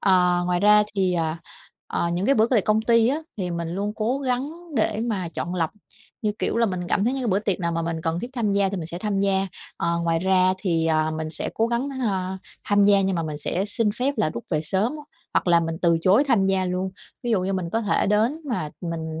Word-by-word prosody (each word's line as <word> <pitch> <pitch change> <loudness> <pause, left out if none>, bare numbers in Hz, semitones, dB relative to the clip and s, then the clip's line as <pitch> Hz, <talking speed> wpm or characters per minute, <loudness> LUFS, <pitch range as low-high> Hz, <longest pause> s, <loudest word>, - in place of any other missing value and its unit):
À, 180 -2 +4
ngoài 180 0 +1
ra 210 +1 +6
thì, 190 -2 +1
à, 165 -1 -1 0.5
à, 170 - -1
những 180 +4 -1
cái 275 - +5
bữa 220 +1 +4
về 235 -5 +4
công 215 +3 +1
ty 230 +1 +4 0.3
thì 180 -3 -3
mình 170 -1 -3
luôn 200 +4 -2
cố 235 +5 0
gắng 260 +1 -1 0.3
để 215 - +1
mà 200 -7 -2
chọn 170 +2 -4
lọc, 165 -3 0 0.5
như 210 -1 +1
kiểu - - -1
là 230 - +3
mình 185 -3 -2
cảm 195 - +1
thấy 245 - +2
những 270 -1 -2
cái 240 - -1
bữa 190 -1 +3
tiệc 200 -3 -1
nào 170 -1 -1
mà 165 0 -1
mình 165 -1 -3
cần 165 +2 -1
thiết 240 - -6
tham 225 -5 0
gia 200 -1 +2
thì 200 - -3
mình 165 -3 -4
sẽ 170 +1 -6
tham 200 -1 -1
gia. 195 -1 +2 0.3
Ờ, 170 0 0
ngoài 165 -1 +1
ra 185 0 +3
thì, 165 -5 0
à, 155 0 +2
mình 155 0 -4
sẽ - - -4
cố 225 - +2
gắng, 240 +4 -1
a, 190 -4 -1 0.3
tham 205 -1 +3
gia 200 -1 +5
nhưng 190 -1 0
mà 165 - 0
mình 155 -2 -4
sẽ 175 +5 -1
xin 210 +1 0
phép 275 +3 +1
là 210 -8 +1
rút 115 - -7
về 155 - +1
sớm, 195 - 0 0.4
hoặc - - +2
là 170 -1 +5
mình 165 0 -3
từ 170 -1 +4
chối 200 - +4
tham 200 -7 +3
gia 190 -1 +1
luôn. 185 +1 -2 0.3
Ví 240 - -2
dụ 215 -5 +3
như 190 +1 -1
mình 180 -3 -2
có 225 - +1
thể 205 -2 +1
đến 220 +9 +2
mà 155 -11 -2
mình 160 -2 -4
190 Hz, 255 wpm, -24 LUFS, 170-215 Hz, 0.5 s, ra